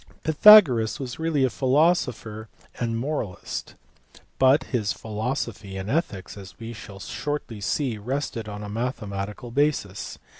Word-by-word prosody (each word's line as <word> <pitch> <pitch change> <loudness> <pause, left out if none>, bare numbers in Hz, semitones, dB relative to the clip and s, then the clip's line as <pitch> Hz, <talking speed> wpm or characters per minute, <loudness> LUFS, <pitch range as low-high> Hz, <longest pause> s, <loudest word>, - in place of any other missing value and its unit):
Pythagoras 155 - +7
was 130 0 -6
really 160 -4 +1
a 130 - +3
philosopher 130 -6 +1 0.3
and 115 -1 -1
moralist, 120 - -4 0.6
but 135 +3 +5
his 105 -6 -1
philosophy 110 -3 -4
and 95 +3 -4
ethics, 110 - -2
as 95 -2 -11
we 115 +1 -7
shall 105 -2 -10
shortly 120 0 -4
see, 115 +2 -1
rested 115 -1 -3
on 105 0 -6
a - - -6
mathematical 105 0 -4
basis. 130 -8 -1
115 Hz, 125 wpm, -25 LUFS, 105-140 Hz, 0.6 s, Pythagoras